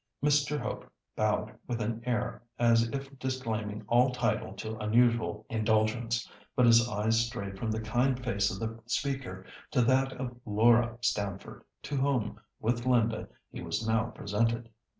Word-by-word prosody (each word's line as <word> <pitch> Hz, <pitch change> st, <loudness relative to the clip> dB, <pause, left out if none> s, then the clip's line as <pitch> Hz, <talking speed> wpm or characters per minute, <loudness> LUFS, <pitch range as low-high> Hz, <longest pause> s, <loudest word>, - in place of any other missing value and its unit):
Mr. 150 Hz, 0 st, +3 dB
Hope -, -, -5 dB, 0.2 s
bowed 110 Hz, 0 st, 0 dB
with 120 Hz, -1 st, -2 dB
an 115 Hz, +1 st, -2 dB
air 120 Hz, -4 st, -1 dB, 0.2 s
as 115 Hz, -1 st, +4 dB
if 135 Hz, +1 st, -6 dB
disclaiming 110 Hz, -5 st, -3 dB
all 125 Hz, +2 st, +5 dB
title 125 Hz, -1 st, -1 dB
to 110 Hz, 0 st, -5 dB
unusual 110 Hz, -1 st, +2 dB
indulgence, 115 Hz, +2 st, +1 dB, 0.3 s
but 125 Hz, -, +5 dB
his 115 Hz, 0 st, +6 dB
eyes 110 Hz, +2 st, +2 dB
strayed 100 Hz, -4 st, -5 dB
from 110 Hz, -, -2 dB
the 110 Hz, 0 st, -1 dB
kind 125 Hz, +4 st, +1 dB
face 100 Hz, -5 st, +1 dB
of 100 Hz, -4 st, -5 dB
the 115 Hz, +1 st, -4 dB
speaker 125 Hz, -8 st, -2 dB, 0.2 s
to 130 Hz, -5 st, +3 dB
that 130 Hz, +2 st, +3 dB
of 125 Hz, -1 st, -5 dB
Laura 115 Hz, +2 st, +4 dB
Stamford, 100 Hz, -4 st, -2 dB, 0.2 s
to 145 Hz, -, -3 dB
whom, 130 Hz, -6 st, 0 dB, 0.2 s
with 120 Hz, +2 st, -1 dB
Linda, 115 Hz, -3 st, +2 dB, 0.2 s
he -, -, -7 dB
was 110 Hz, +1 st, -2 dB
now 110 Hz, 0 st, +2 dB
presented. 115 Hz, +2 st, -1 dB
115 Hz, 150 wpm, -30 LUFS, 110-125 Hz, 0.3 s, his